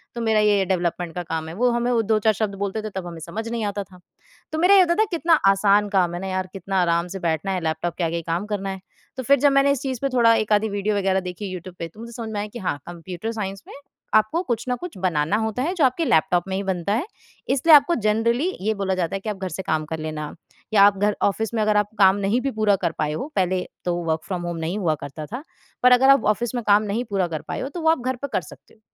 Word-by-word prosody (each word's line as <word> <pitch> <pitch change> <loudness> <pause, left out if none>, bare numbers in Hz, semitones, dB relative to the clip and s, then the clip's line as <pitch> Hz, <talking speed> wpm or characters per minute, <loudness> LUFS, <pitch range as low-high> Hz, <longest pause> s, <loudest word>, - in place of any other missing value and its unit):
तो 235 - -3
मेरा 220 -1 +2
ये 205 -2 +3
डेवलपमेंट 175 -2 -1
का 180 - -3
काम 160 -1 -4
है, - - -7
वो 245 +5 +2
हमें 240 +1 0
वो 235 -2 +3
2-4 220 0 +2
शब्द 210 -1 -2
बोलते 200 +2 -2
थे 215 - -4
तब 185 -2 -4
हमें 170 -1 -8
समझ 220 +6 -5
नहीं 230 -2 -2
आता 205 0 -3
था। 180 -1 -18 0.5
तो 315 - -3
मेरा 370 +4 +6
ये 385 - +8
होता 340 -1 +3
था 435 - +4
कि 365 -5 -3
कितना 330 +1 +2 0.2
आसान 200 +1 +3
काम 180 -3 +1
है 175 - -4
ना 195 - -4
यार, 185 0 -2
कितना 190 0 -1
आराम 170 0 +1
से - - -4
बैठना 170 +2 -1
है, 185 -1 -1
लैपटॉप 160 +2 -2
के 175 - -1
आगे 165 0 -1
ही 170 - -2
काम 175 +5 -1
करना 200 -2 -3
है, 190 0 -5 0.4
तो 260 - -3
फिर 280 +2 +4
जब 285 +1 +4
मैंने 275 0 +4
इस 280 - -1
चीज़ 260 -3 -3
पे 275 - 0
थोड़ा 230 -1 +6
1 215 -1 +1
आधी 215 +1 +2
वीडियो 205 +1 -1
वगैरह 190 -1 +1
देखी 180 +3 -7
यूट्यूब 180 0 -8
पे 170 - -3
तो 170 +7 -18
मुझे 235 +1 -8
समझ 230 -1 -6
में 205 - -2
आया 205 - -3
कि 240 - -6
हाँ, 180 -6 -2
कंप्यूटर 175 +5 -6
साइंस 195 -3 -5
में - - -11 0.4
आपको 215 +10 +3
कुछ 235 -9 -2
न 250 - +1
कुछ 350 - -8
बनाना 175 0 0
होता 220 +2 -2
है, 345 - -1
जो 345 -5 0
आपके 260 +6 +1
लैपटॉप 180 - +2
में 190 - -2
ही 195 - -2
बनता 190 0 -1
है, 245 +10 0 0.4
इसलिए 280 +4 +6
आपको 290 +4 +5
जनरली 235 +9 +2
ये 215 +3 +1
बोला 190 -2 -1
जाता 180 +1 -2
है - - -2
कि 215 - -5
आप 210 - -2
घर 190 -1 -4
से 185 +3 -5
काम 155 -1 -1
कर 160 - -3
लेना 155 -1 -5 0.4
या 200 -2 +7
आप 200 0 +5
घर 205 +1 +1
ऑफ़िस 220 +3 0
में 225 - 0
अगर 215 -1 +2
आप 210 - +2
काम 190 -1 +6
नहीं 225 +6 +1
भी 275 - -1
पूरा 215 -3 +2
कर 170 - +1
पाए 150 -1 0
हो 265 - -4
पहले 185 -1 +1 0.2
तो 175 -1 0
वर्क 160 0 0
फ्रॉम 185 -3 -3
होम 170 -1 -4
नहीं 165 +4 -3
हुआ 160 -5 +1
करता 140 +2 -7
था। 245 - -6 0.4
पर 250 - +7
अगर 260 +2 +6
आप 275 -3 +5
ऑफ़िस 240 +3 -4
में 240 - -2
काम 205 +1 +5
नहीं 215 +3 -2
पूरा 195 -3 0
कर 160 -3 -5
पाए - - -4
हो, 265 - -4
तो 335 +4 -6
वो 320 - +3
आप 325 - +3
घर 260 0 0
पर 280 +3 -5
कर - - +1
सकते 150 - -15
हो। - - -25
205 Hz, 290 wpm, -23 LUFS, 180-235 Hz, 0.5 s, ये